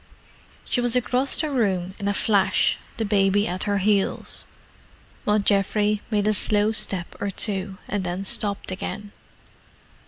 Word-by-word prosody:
She 245 - 0
was 245 0 +2
across 250 +2 +3
the 310 -2 -1
room 190 -8 -1
in 200 - -3
a 205 - +1
flash, 200 -3 +2 0.2
the 225 - -1
baby 200 0 +2
at 180 +2 -3
her 205 -1 0
heels, 200 0 0 0.8
while 210 0 +2
Geoffrey 205 +1 +1
made 210 -2 0
a 215 - +2
slow 210 +1 +2
step 190 -5 0
or 200 - -1
two, 195 -1 -1
and 205 -1 -2
then 180 +2 -4
stopped 205 -3 +1
again. 205 +2 -6
205 Hz, 150 wpm, -23 LUFS, 195-215 Hz, 0.8 s, across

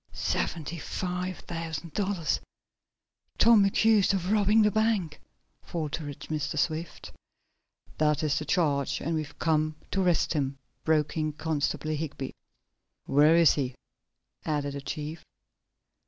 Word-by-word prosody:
"Seventy 165 0 -2
five 180 +2 -3
thousand 165 -1 -5
dollars! 190 -6 0 1.0
Tom 230 -3 +6
accused 205 0 +4
of 185 0 -2
robbing 215 +1 +4
the 210 - +4
bank!" 210 -8 0 0.4
faltered 150 -3 -5
Mr. 155 -1 -3
Swift. 155 +1 -2 0.9
"That 150 -1 +2
is 150 -1 +1
the 155 - -5
charge, 145 -7 +1
and 165 - -2
we've 155 -2 -4
come 155 -1 +1 0.2
to 195 - +1
arrest 175 -2 +2
him," 140 -3 -1 0.3
broke 155 -1 +1
in 155 -1 0
Constable 155 0 -1
Higby. 145 -3 -4 0.7
"Where 150 +4 +5
is 170 -3 +6
he?" 130 -4 -2 0.7
added 145 -2 -1
the 140 - -5
chief. 150 +2 -5
160 Hz, 125 wpm, -28 LUFS, 150-180 Hz, 1.0 s, Tom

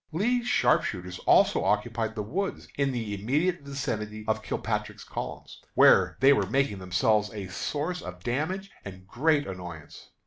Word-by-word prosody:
Lee's 240 +8 0
sharpshooters 90 - +1
also - - +5
occupied 110 +1 0
the 105 - -2
woods 190 - -3
in 140 -1 +1
the 115 -4 -3
immediate 145 - 0
vicinity 110 -6 -4
of 110 0 0
Kilpatrick's - - -3
columns, - - -7
where - - +6
they 135 +1 +7
were - - +1
making 135 -7 +1
themselves 105 +3 +1
a 100 -3 -5
source 155 - -3
of 90 0 -9
damage 170 +11 -2
and 95 -1 -10
great 145 +6 +2
annoyance. 90 -5 -9
115 Hz, 145 wpm, -27 LUFS, 100-145 Hz, -, they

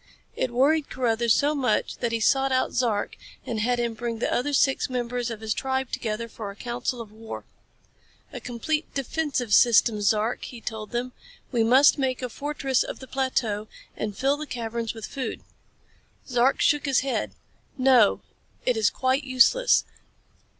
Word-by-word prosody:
It - - -1
worried 280 +5 +2
Carruthers 235 -2 +1
so 290 +1 +2
much 270 -4 0
that 235 -2 -1
he 230 - 0
sought 270 +4 +2
out 260 0 +1
Zark 230 -5 0 0.3
and 225 - -3
had 245 +3 +1
him 235 -1 -1
bring 230 0 -4
the 225 - -1
other 270 +4 0
six 270 0 +2
members 245 -1 -2
of 225 -2 -6
his 220 -1 -1
tribe 265 -1 -2
together 225 +1 -3
for 215 -2 -7
a 200 - -9
council 240 +1 -3
of 220 -2 -10
war. 220 +1 -8 0.9
"A 250 - -5
complete 255 +7 -3
defensive 275 -4 -1
system, 230 -2 +5
Zark," 215 +3 +1
he 245 - -9
told 220 -2 -6
them. 245 +1 -3 0.4
"We 235 -3 +2
must 265 +6 +5
make 260 -1 -1
a 250 - -2
fortress 275 -1 -1
of - - -4
the 260 - -10
plateau 245 -6 -1 0.3
and 210 -2 -4
fill 275 +2 +1
the 305 0 -6
caverns 230 -2 -4
with 225 - -6
food." 265 -2 -5 0.9
Zark 250 +1 +2
shook 295 0 +2
his 270 -2 +3
head. 270 -1 -2 0.4
"No. 255 -5 +4 0.4
It 250 - +2
is 215 -2 +3
quite 260 +2 0
useless. 265 - +4
245 Hz, 170 wpm, -25 LUFS, 225-265 Hz, 0.9 s, system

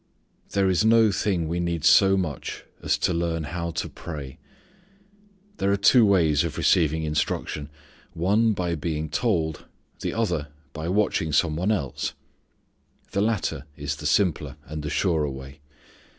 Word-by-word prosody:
There 100 -1 +2
is 95 +1 +2
no 110 -1 +5
thing 90 -4 0
we 85 +2 -2
need 85 -2 -2
so 95 +3 +6
much 80 -8 -4 0.2
as - - +1
to - - 0
learn 85 -1 -1
how 85 +3 -4
to - - -2
pray. 70 -6 -8 1.2
There 100 - +1
are 100 - +2
two 110 +3 +6
ways 80 -7 +3
of 85 - -4
receiving 80 -1 +2
instruction; 75 -1 -2 0.4
one, 105 +6 +2
by 90 -3 -2
being 80 -1 -3
told; 80 -4 -1 0.3
the - - -3
other, 90 -10 -1 0.3
by 80 +1 -5
watching 95 -5 +1
some 80 +1 +2
one 90 +6 0
else. 70 -8 -2 1.0
The 100 - 0
latter 105 -10 -1
is 75 0 -3
the - - -3
simpler 80 -7 +1
and 75 0 -6
the 75 - -4
surer 80 -2 +1
way. 65 +2 -9
85 Hz, 150 wpm, -25 LUFS, 75-95 Hz, 1.2 s, so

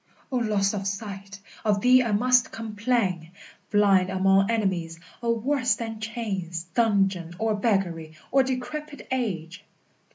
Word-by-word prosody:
O 255 - 0
loss 210 -4 +1
of 195 -1 -3
sight, 200 -1 -6 0.2
of 210 -2 +1
thee 255 +2 +6
I 235 -3 -1
must 250 +4 +3
complain! 215 -6 -1 0.4
Blind 195 -3 +4
among 195 +1 +3
enemies, 185 -7 -1 0.2
O, 235 -1 +1
worse 250 +2 +1
than 225 -2 -6
chains, 195 -7 -4
Dungeon, 195 -6 +1
or 220 +1 0
beggary, 190 -7 -1 0.2
or 270 - +5
decrepit 265 +1 -4
age! 195 -7 -3
205 Hz, 130 wpm, -26 LUFS, 190-235 Hz, 0.4 s, thee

